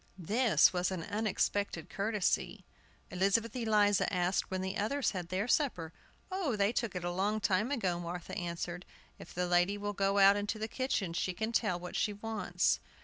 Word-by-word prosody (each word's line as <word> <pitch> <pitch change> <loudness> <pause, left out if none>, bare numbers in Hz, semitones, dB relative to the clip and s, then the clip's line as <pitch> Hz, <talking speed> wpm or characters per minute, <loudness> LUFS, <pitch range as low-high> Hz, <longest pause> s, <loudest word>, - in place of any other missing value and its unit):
This 215 +7 +3
was 180 0 +1
an 185 -3 -4
unexpected 205 -4 -1
courtesy. 205 +1 -1 0.5
Elizabeth 200 +5 +1
Eliza 210 -4 +2
asked 180 0 0
when 185 0 -2
the 190 +1 -3
others 265 +6 0
had 180 -3 -5
their 190 +5 -1
supper. 210 - 0 0.4
"Oh, 365 - -1
they 200 0 +2
took 235 -6 -2
it 180 - -3
a 175 - -1
long 200 +4 0
time 205 +3 +1
ago," 190 -11 -1
Martha 175 0 -6
answered. 175 0 -4 0.4
"If - - -11
the 180 +1 -1
lady 175 +3 +2
will 205 0 -3
go 195 0 +1
out 200 0 +7
into 205 +2 -2
the 220 0 -3
kitchen 225 -8 -2
she 180 +2 -1
can 220 +3 -2
tell 210 -6 +1
what 180 0 -8
she 210 - 0
wants." 220 +1 0
200 Hz, 180 wpm, -32 LUFS, 180-220 Hz, 0.5 s, out